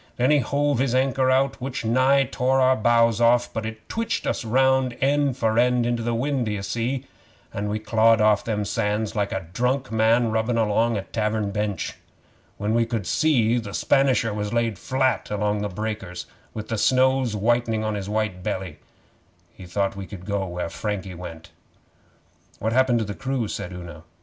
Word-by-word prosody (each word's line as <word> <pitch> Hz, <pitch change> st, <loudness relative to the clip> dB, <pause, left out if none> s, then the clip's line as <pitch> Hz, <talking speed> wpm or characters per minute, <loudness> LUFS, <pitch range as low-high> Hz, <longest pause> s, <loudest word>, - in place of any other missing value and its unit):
Then 125 Hz, +4 st, +3 dB
he 150 Hz, -, +5 dB
hove 140 Hz, +1 st, 0 dB
his 130 Hz, -2 st, +1 dB
anchor 130 Hz, 0 st, +2 dB
out, 135 Hz, +1 st, +1 dB
which 130 Hz, -2 st, -4 dB
nigh 130 Hz, +4 st, +4 dB
tore 130 Hz, +1 st, 0 dB
our 130 Hz, 0 st, +4 dB
bows 115 Hz, 0 st, +3 dB
off, 120 Hz, +1 st, +3 dB
but 110 Hz, -1 st, -3 dB
it 110 Hz, 0 st, -9 dB
twitched 230 Hz, 0 st, -2 dB
us -, -, -1 dB
round 130 Hz, +1 st, +2 dB
end 140 Hz, -1 st, +1 dB
for 110 Hz, -2 st, +1 dB
end 125 Hz, -1 st, +3 dB
into 120 Hz, -1 st, 0 dB
the 115 Hz, 0 st, -1 dB
wind, 130 Hz, 0 st, -1 dB
d'ye 105 Hz, -2 st, -2 dB
see, 120 Hz, +7 st, -2 dB, 0.5 s
an' 105 Hz, +1 st, -3 dB
we 105 Hz, -, -1 dB
clawed 115 Hz, +1 st, +3 dB
off 105 Hz, -1 st, +3 dB
them 105 Hz, -2 st, -2 dB
sands 105 Hz, 0 st, -1 dB
like 100 Hz, -1 st, -1 dB
a 95 Hz, -2 st, -3 dB
drunk 125 Hz, +2 st, 0 dB
man 110 Hz, +1 st, +3 dB
rubbin' 110 Hz, +2 st, 0 dB
along 115 Hz, +1 st, +2 dB
a 95 Hz, -, -3 dB
tavern 105 Hz, -1 st, -2 dB
bench. 105 Hz, -1 st, -3 dB, 0.6 s
When 105 Hz, +2 st, -1 dB
we 115 Hz, 0 st, +3 dB
could 115 Hz, -5 st, -3 dB
see, 120 Hz, -, +2 dB
the 100 Hz, -4 st, -7 dB
Spanisher 130 Hz, -5 st, +2 dB
was 105 Hz, 0 st, -3 dB
laid 115 Hz, -4 st, 0 dB
flat 130 Hz, -1 st, 0 dB
along 105 Hz, 0 st, 0 dB
in -, -, -3 dB
the 105 Hz, -, -2 dB
breakers 100 Hz, -3 st, -5 dB, 0.3 s
with 110 Hz, 0 st, -6 dB
the 115 Hz, -2 st, -1 dB
snows 130 Hz, -2 st, +2 dB
whitening 115 Hz, +1 st, +1 dB
on 110 Hz, 0 st, -1 dB
his 100 Hz, -1 st, -4 dB
wet 105 Hz, -4 st, -1 dB
belly. 90 Hz, -4 st, -4 dB, 0.7 s
He 95 Hz, -, -12 dB
thought 100 Hz, +2 st, -1 dB
he 100 Hz, -1 st, -7 dB
could 90 Hz, -3 st, -10 dB
go 100 Hz, -2 st, -2 dB
where 90 Hz, -1 st, -4 dB
Frankie 100 Hz, -1 st, -4 dB
went.' 85 Hz, -2 st, -9 dB, 1.1 s
'What 110 Hz, +1 st, -2 dB
happened 130 Hz, -1 st, +3 dB
to 110 Hz, -, -1 dB
the 105 Hz, -, -5 dB
crew?' 130 Hz, -1 st, -2 dB
said 90 Hz, -, -5 dB
Una. 85 Hz, -3 st, -9 dB
115 Hz, 190 wpm, -24 LUFS, 105-125 Hz, 1.1 s, he